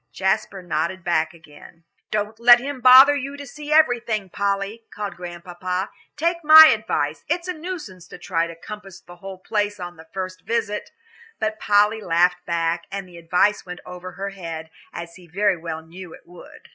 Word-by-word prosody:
Jasper 195 0 -1
nodded 170 +2 -2
back 160 -2 +1
again. 165 0 -17 0.3
"Don't 215 +1 -3
let 240 +1 +8
him 270 0 -6
bother 260 +3 +9
you 280 0 -5
to 285 - -8
see 295 +2 -9
everything, 235 - +2
Polly," 200 +2 -2
called 205 -1 -5
Grandpapa. 180 +2 -5 0.3
"Take 335 +2 0
my 315 +1 +10
advice 160 -9 -2
it's 345 +2 -1
a 365 - -2
nuisance 310 - -8
to - - -11
try 165 -1 -1
to 170 - -9
compass 195 +2 -10
the 175 0 -15
whole 195 +1 -9
place 205 +1 -2
on 175 -1 -7
the 160 0 -14
first 185 -2 -5
visit." 210 -1 -2 0.5
But 215 0 -2
Polly 210 +2 +3
laughed 175 0 +2
back, 170 0 -1
and 195 -1 -5
the 175 -1 -14
advice 180 +5 +1
went 180 -1 -9
over 180 0 -9
her 195 +2 -5
head, 165 -4 -7 0.2
as 170 0 -8
he 180 -2 -16
very 195 +3 +1
well 160 -1 -6
knew 175 +1 -11
it - - -20
would. 175 0 -15
190 Hz, 180 wpm, -22 LUFS, 175-220 Hz, 0.5 s, my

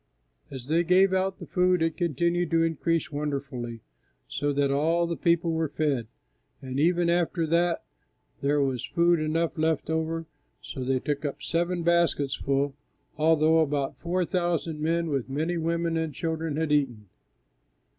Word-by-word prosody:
As 130 -3 -8
they 160 +5 +2
gave 185 +2 +4
out 190 0 0
the - - -9
food 180 -2 +2
it 165 -1 0
continued 170 +1 0
to 165 -1 +3
increase 165 -1 0
wonderfully, 140 -5 -4 0.5
so 145 0 -1
that 140 -1 +1
all 165 +5 +2
the 170 0 -2
people 170 0 +2
were 160 -1 0
fed; 140 -6 -1 0.5
and 130 0 -4
even 175 +2 +3
after 170 -1 +1
that 170 +1 +1 0.6
there 145 +1 +2
was 130 -3 -1
food 170 -1 +2
enough 160 +2 -1
left 160 -1 +1
so 160 +1 -1 0.5
that 130 - -3
they 130 -1 +2
took 145 +2 -3
up 145 -2 -4
seven 175 +1 -1
baskets 170 -5 +2
full, 140 0 0 0.4
although 160 +1 +4
about 145 -3 0
four 180 +1 0
thousand 170 -3 -1
men, 165 +2 0
with 135 -4 -2
many 160 +6 -1
women 165 0 -1
and 160 -3 -2
children, 160 -1 -2
had 160 -1 -1
eaten. 125 -8 0
160 Hz, 155 wpm, -27 LUFS, 145-170 Hz, 0.6 s, gave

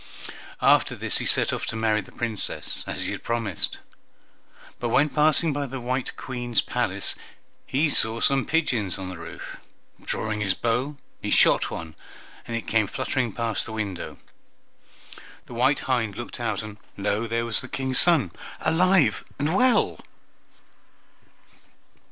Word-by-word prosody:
After - - +4
this - - 0
he - - -2
set - - +2
off - - -3
to - - -3
marry 110 -1 +2
the - - -15
Princess, 115 -4 -1
as - - -2
he - - -2
had - - -5
promised, 115 -6 -1 1.0
but 120 - -1
when 145 +6 +4
passing 155 +1 +3
by 145 0 -2
the 130 +1 -5
white 125 +1 -2
Queen's 120 -3 -2
palace - - 0 0.5
he 145 +5 +2
saw 110 -1 +5
some 135 +1 +2
pigeons 120 - +1
on 95 -1 -5
the 90 - -7
roof. 85 - -8 0.4
Drawing 110 -1 -2
his 95 -3 +1
bow, 125 +5 -1 0.2
he - - -3
shot - - +5
one, 80 -1 -6 0.5
and 115 -1 -2
it 115 - -5
came 110 -3 +2
fluttering 125 +2 -1
past 115 0 -2
the 110 - -6
window. 100 -5 -4 1.3
The - - -11
white 130 +4 +2
hind 115 -6 0
looked 120 +2 -7
out, 110 -4 -1
and 105 -1 -8 0.2
lo! 105 +3 0
there 115 +1 -1
was 115 -2 +2
the 130 - -7
King's 130 0 0
son 160 - +4 0.3
alive 170 - +3
and 145 +3 0
well. 255 +5 +3
120 Hz, 150 wpm, -25 LUFS, 110-135 Hz, 1.3 s, saw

